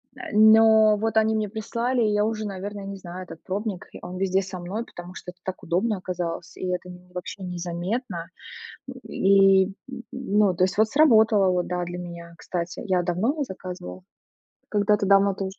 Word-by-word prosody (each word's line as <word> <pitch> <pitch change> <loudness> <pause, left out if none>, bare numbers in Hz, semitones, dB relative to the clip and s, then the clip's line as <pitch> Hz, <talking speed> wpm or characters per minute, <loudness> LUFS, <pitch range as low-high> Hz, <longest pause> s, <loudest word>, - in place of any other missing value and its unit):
Э, 255 - -8
но 220 0 +6
вот, 220 +1 -1
они 220 0 +3
мне 215 -2 -1
прислали, 235 +3 -1
и 210 - +2
я 210 0 +2
уже, 220 -1 -2
наверно, 200 +1 -5
не 195 0 -6
знаю. 180 0 -8
Этот 165 -2 -11
пробник. 200 -1 -4 0.2
Он 180 +1 -6
везде 190 0 +1
со 185 -1 -7
мной, 200 +7 -4
потому 175 +1 -11
что 180 - -8
это 180 - -30
так 190 - -6
удобно 195 +6 0
оказалось, 180 -1 -5
и - - -5
это 180 0 -3
н 180 0 -13
вообще 180 +2 -7
незаметно. 175 +2 -4 0.8
И, 195 0 +5
н 195 +1 -7 0.4
ну, 210 -6 +1
то 180 - -1
есть 190 +2 -2
вот 220 - +4
сработало, 220 -8 +5
вот 180 -1 0
да, 180 0 -2
для 175 0 -6
меня, 170 -1 -8
кстати, 170 0 -4
я 185 -4 +1
давно 215 - 0
заказывала. 185 -4 -7 0.7
Когда-то 210 0 +2
давно 200 0 +4
тоже 190 0 -5
195 Hz, 180 wpm, -25 LUFS, 180-215 Hz, 0.8 s, но